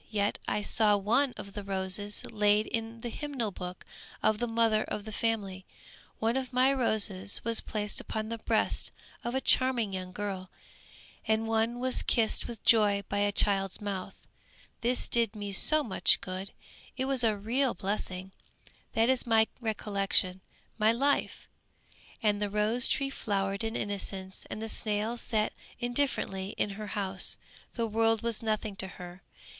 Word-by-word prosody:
Yet, 205 Hz, -2 st, 0 dB
I 210 Hz, -, 0 dB
saw 210 Hz, -1 st, +3 dB
one 240 Hz, +7 st, +2 dB
of 200 Hz, -, -8 dB
the 205 Hz, -, -5 dB
roses 195 Hz, +1 st, +2 dB
laid 210 Hz, -1 st, +3 dB
in 225 Hz, 0 st, -4 dB
the 240 Hz, -, -4 dB
hymn 295 Hz, +5 st, -5 dB
book 185 Hz, -6 st, -4 dB, 0.4 s
of 215 Hz, -1 st, +3 dB
the 240 Hz, -, -1 dB
mother 225 Hz, -1 st, +2 dB
of 205 Hz, -, -5 dB
the 220 Hz, -, -6 dB
family; 205 Hz, -4 st, -2 dB, 0.5 s
one 225 Hz, +2 st, 0 dB
of 265 Hz, -1 st, -2 dB
my 255 Hz, +2 st, +4 dB
roses 210 Hz, -6 st, +2 dB
was 230 Hz, 0 st, +2 dB
placed 210 Hz, -1 st, -2 dB
upon 220 Hz, 0 st, -4 dB
the 230 Hz, 0 st, -4 dB
breast -, -, +1 dB, 0.3 s
of 240 Hz, +2 st, -3 dB
a -, -, +2 dB
charming 245 Hz, -8 st, +2 dB
young 185 Hz, -1 st, -4 dB
girl, 190 Hz, -2 st, -4 dB, 0.8 s
and 220 Hz, 0 st, +1 dB
one 225 Hz, +2 st, +1 dB
was 255 Hz, 0 st, 0 dB
kissed 225 Hz, -3 st, +1 dB
with 235 Hz, -3 st, -8 dB
joy 205 Hz, -3 st, +4 dB
by 200 Hz, -, 0 dB
a 205 Hz, 0 st, +2 dB
child's 195 Hz, -2 st, +2 dB
mouth. 195 Hz, -2 st, -4 dB, 0.7 s
This 245 Hz, +2 st, +1 dB
did 230 Hz, -2 st, +3 dB
me 205 Hz, -1 st, -5 dB
so 305 Hz, +10 st, +4 dB
much 205 Hz, -7 st, +3 dB
good, 190 Hz, +1 st, -6 dB, 0.5 s
it 260 Hz, -, 0 dB
was 265 Hz, -2 st, +1 dB
a 220 Hz, -2 st, +2 dB
real 240 Hz, +5 st, 0 dB
blessing! 190 Hz, -1 st, -3 dB, 0.6 s
That 225 Hz, +1 st, +3 dB
is 260 Hz, -1 st, +2 dB
my 225 Hz, -1 st, +5 dB
recollection, 200 Hz, -4 st, 0 dB, 0.4 s
my 215 Hz, +1 st, +5 dB
life!" 275 Hz, +5 st, 0 dB, 0.8 s
And 210 Hz, -1 st, +2 dB
the 205 Hz, -, 0 dB
rose 210 Hz, +4 st, +5 dB
tree 275 Hz, -2 st, 0 dB
flowered 200 Hz, -4 st, -2 dB
in 225 Hz, +1 st, -2 dB
innocence, 195 Hz, -2 st, -3 dB
and 215 Hz, -, -5 dB
the -, -, -3 dB
snail 215 Hz, +1 st, -1 dB
sat 220 Hz, -2 st, 0 dB, 0.3 s
indifferently 240 Hz, -6 st, -1 dB
in 205 Hz, -, 0 dB
her 210 Hz, +1 st, -6 dB
house. 190 Hz, -1 st, -1 dB, 0.4 s
The 235 Hz, -, 0 dB
world 225 Hz, 0 st, +1 dB
was 230 Hz, -2 st, -1 dB
nothing 215 Hz, -2 st, -1 dB
to 190 Hz, -, -1 dB
her. 180 Hz, 0 st, -10 dB
215 Hz, 160 wpm, -30 LUFS, 200-230 Hz, 0.8 s, my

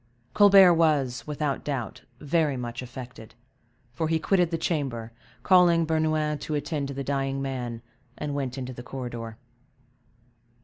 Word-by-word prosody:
Colbert 195 Hz, -3 st, +7 dB
was, 150 Hz, -7 st, +1 dB
without 150 Hz, -2 st, -2 dB
doubt, 130 Hz, -8 st, -4 dB, 0.2 s
very 150 Hz, -2 st, 0 dB
much 120 Hz, 0 st, -5 dB
affected, 125 Hz, -3 st, -10 dB, 0.6 s
for 160 Hz, +5 st, -1 dB
he 160 Hz, 0 st, +1 dB
quitted 175 Hz, +1 st, +2 dB
the 165 Hz, -, -1 dB
chamber, 135 Hz, -9 st, -2 dB, 0.3 s
calling 175 Hz, -3 st, +5 dB
Bernouin 155 Hz, -1 st, 0 dB
to 155 Hz, -, -4 dB
attend 145 Hz, -1 st, -2 dB
to 140 Hz, -, -6 dB
the 140 Hz, -, -3 dB
dying 135 Hz, 0 st, -1 dB
man, 125 Hz, -4 st, -4 dB, 0.3 s
and 150 Hz, -1 st, -4 dB
went 135 Hz, -2 st, -3 dB
into 130 Hz, -1 st, -5 dB
the 120 Hz, -, -9 dB
corridor. 120 Hz, -3 st, -7 dB
140 Hz, 140 wpm, -26 LUFS, 125-160 Hz, 0.6 s, Colbert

